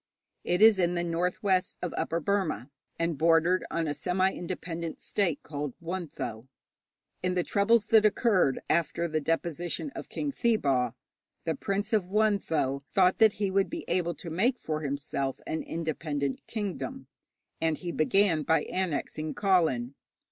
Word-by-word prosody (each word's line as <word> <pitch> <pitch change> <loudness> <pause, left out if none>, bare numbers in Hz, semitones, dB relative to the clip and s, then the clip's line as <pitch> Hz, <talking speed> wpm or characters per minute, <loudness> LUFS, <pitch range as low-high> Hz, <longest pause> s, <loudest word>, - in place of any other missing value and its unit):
It 180 +4 +2
is 220 -3 +7
in 175 0 +2
the 175 - 0
north 175 +3 -1
west 190 -2 +1
of 175 - -2
Upper 165 - -1
Burma, 155 - -1 0.3
and 165 -3 -1
bordered 165 +3 +4
on 165 -1 -1
a 145 - 0
semi 185 +4 +1
independent 170 -2 -5
state 180 -8 -1
called 145 -3 -5
Wuntho. 165 -10 -5 0.7
In 180 0 0
the 180 - +2
troubles 205 +3 +3
that 220 0 +5
occurred 205 - +3
after 170 +1 +1
the 155 -1 -1
deposition 170 - -2
of - - -8
King 290 - -2
Thibaw, 140 - +1 0.5
the 165 - 0
Prince 200 +8 -2
of 210 -4 +3
Wuntho 185 -9 +1
thought 185 -1 +3
that 220 -2 +6
he 200 -2 -1
would 195 0 +2
be 335 0 -5
able 175 -2 0
to 165 +2 -8
make 235 +10 +2
for 155 -6 -3
himself 140 -2 -3
an 160 - -2
independent 155 -4 -3
kingdom, 220 +5 -4 0.6
and 160 -2 +1
he 175 -2 -5
began 170 0 +3
by 160 +1 +2
annexing 155 -3 -2
Kawlin. 165 -11 +2
170 Hz, 155 wpm, -29 LUFS, 155-195 Hz, 0.7 s, is